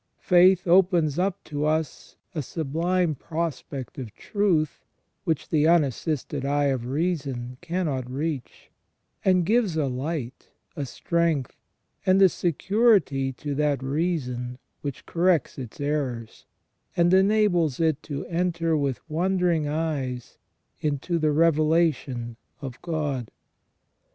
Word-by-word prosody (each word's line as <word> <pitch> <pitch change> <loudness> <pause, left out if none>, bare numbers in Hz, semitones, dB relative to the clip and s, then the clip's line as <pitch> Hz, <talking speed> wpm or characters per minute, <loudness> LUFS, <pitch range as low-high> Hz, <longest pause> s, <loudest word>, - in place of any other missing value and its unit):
Faith 180 0 +5
opens 175 -4 +4
up 195 +1 -1
to 145 -1 -4
us 155 0 -2 0.2
a 160 - -2
sublime 165 +4 0
prospect 145 -4 -5
of 120 -5 -6
truth 180 -8 0 0.4
which 160 -3 -1
the 155 -1 +3
unassisted 150 -3 +1
eye 145 +1 +1
of 120 -2 -4
reason 135 -5 -2
cannot 165 -8 -2
reach, 140 0 -4 0.5
and 185 -2 +3
gives 210 -5 +2
a 155 - +2
light, 130 0 -4 0.3
a 140 -2 -3
strength, 165 -3 0 0.5
and 185 +1 +4
a 190 -1 +7
security 175 - +2
to 145 +3 -5
that 145 -2 0
reason 135 -5 -2 0.2
which 140 -3 -6
corrects 170 -4 +1
its 125 0 -8
errors, 140 -6 -3 0.5
and 175 +1 +4
enables 190 - +3
it 160 -3 +1
to 140 -2 -5
enter 170 -1 0
with 140 -2 -2
wondering 175 -1 +1
eyes 145 -6 -3 0.4
into 150 +3 -1
the 155 -1 +2
revelation 155 -6 +2 0.2
of 135 -4 -8
God. 145 -8 -2
155 Hz, 115 wpm, -25 LUFS, 135-175 Hz, 0.5 s, a